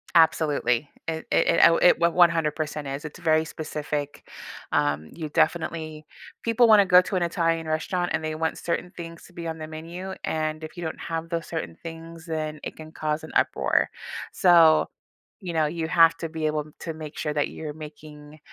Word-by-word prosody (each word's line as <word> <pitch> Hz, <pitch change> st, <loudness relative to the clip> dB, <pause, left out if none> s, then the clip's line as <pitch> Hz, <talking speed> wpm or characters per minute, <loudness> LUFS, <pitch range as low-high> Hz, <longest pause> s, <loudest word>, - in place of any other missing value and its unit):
Absolutely. 150 Hz, -5 st, +3 dB, 0.2 s
It 160 Hz, -1 st, -3 dB
it -, -, +3 dB
it -, -, +3 dB
oh, 165 Hz, -, +4 dB
it 175 Hz, -, +5 dB
one 170 Hz, 0 st, +3 dB
100% 155 Hz, -4 st, +2 dB
is. 140 Hz, +3 st, -5 dB
It's 150 Hz, -, -8 dB
very 160 Hz, -2 st, +2 dB
specific. 150 Hz, -2 st, -5 dB, 0.4 s
Um, 75 Hz, +2 st, 0 dB
you 155 Hz, -3 st, -6 dB
definitely 155 Hz, -1 st, -1 dB, 0.4 s
people 230 Hz, +1 st, +4 dB
wanna 210 Hz, -3 st, +7 dB
go 180 Hz, -1 st, +7 dB
to 190 Hz, -, -4 dB
an 180 Hz, -, +1 dB
Italian 165 Hz, -1 st, 0 dB
restaurant, 175 Hz, +3 st, -1 dB
and 160 Hz, 0 st, -1 dB
they 155 Hz, -, -2 dB
want 160 Hz, 0 st, -1 dB
certain 175 Hz, +1 st, -3 dB
things 165 Hz, -1 st, -8 dB
to 180 Hz, -, -18 dB
be 170 Hz, -1 st, -6 dB
on 160 Hz, -, -4 dB
the 155 Hz, -, -6 dB
menu, 170 Hz, +4 st, -7 dB
and 155 Hz, 0 st, -2 dB
if 155 Hz, -, -8 dB
you 175 Hz, -, -5 dB
don't 160 Hz, -, -4 dB
have 165 Hz, 0 st, -4 dB
those 165 Hz, -1 st, -2 dB
certain 85 Hz, -1 st, -5 dB
things, 165 Hz, 0 st, -9 dB
then 155 Hz, -2 st, -3 dB
it -, -, -6 dB
can 155 Hz, 0 st, -11 dB
cause 155 Hz, 0 st, -2 dB
an 155 Hz, -, -9 dB
uproar. -, -, +2 dB, 0.4 s
So, 165 Hz, -3 st, +6 dB, 0.5 s
you 180 Hz, -3 st, -5 dB
know, 160 Hz, -1 st, +2 dB
you 160 Hz, +1 st, -3 dB
have 165 Hz, -1 st, +5 dB
to 165 Hz, -, -5 dB
be 160 Hz, 0 st, -4 dB
able 150 Hz, -1 st, -1 dB, 0.2 s
to 165 Hz, -, -4 dB
make 155 Hz, -1 st, -9 dB
sure 150 Hz, -, -2 dB
that 145 Hz, -1 st, 0 dB
you're 150 Hz, -2 st, -6 dB
making, 150 Hz, 0 st, -11 dB
160 Hz, 195 wpm, -25 LUFS, 155-170 Hz, 0.5 s, wanna